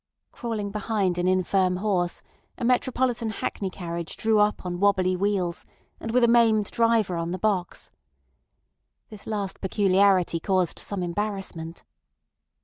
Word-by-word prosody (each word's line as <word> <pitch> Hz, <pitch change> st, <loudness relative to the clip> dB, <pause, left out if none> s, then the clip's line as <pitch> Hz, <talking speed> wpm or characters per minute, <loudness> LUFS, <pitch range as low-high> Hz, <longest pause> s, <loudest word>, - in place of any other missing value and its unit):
Crawling 215 Hz, -4 st, -4 dB
behind 200 Hz, -4 st, -1 dB
an 175 Hz, -, +1 dB
infirm 185 Hz, 0 st, +2 dB
horse, 180 Hz, -3 st, -1 dB, 0.3 s
a -, -, -3 dB
metropolitan 250 Hz, -2 st, +1 dB
hackney 200 Hz, -2 st, -3 dB
carriage 170 Hz, -2 st, -6 dB
drew 220 Hz, -1 st, +2 dB
up 210 Hz, -2 st, +1 dB
on 175 Hz, -1 st, -3 dB
wobbly 190 Hz, -2 st, +2 dB
wheels 185 Hz, -3 st, -1 dB, 0.4 s
and 225 Hz, -, -6 dB
with 245 Hz, +2 st, +2 dB
a -, -, +6 dB
maimed 225 Hz, -3 st, +3 dB
driver 230 Hz, -6 st, +2 dB
on 170 Hz, 0 st, -2 dB
the 180 Hz, -, -3 dB
box. 185 Hz, -3 st, -2 dB, 1.2 s
This 210 Hz, -2 st, -11 dB
last 205 Hz, -3 st, -3 dB
peculiarity 190 Hz, -3 st, +3 dB
caused 185 Hz, 0 st, 0 dB
some 200 Hz, -3 st, -4 dB
embarrassment. 175 Hz, -3 st, -4 dB
195 Hz, 135 wpm, -25 LUFS, 180-215 Hz, 1.2 s, a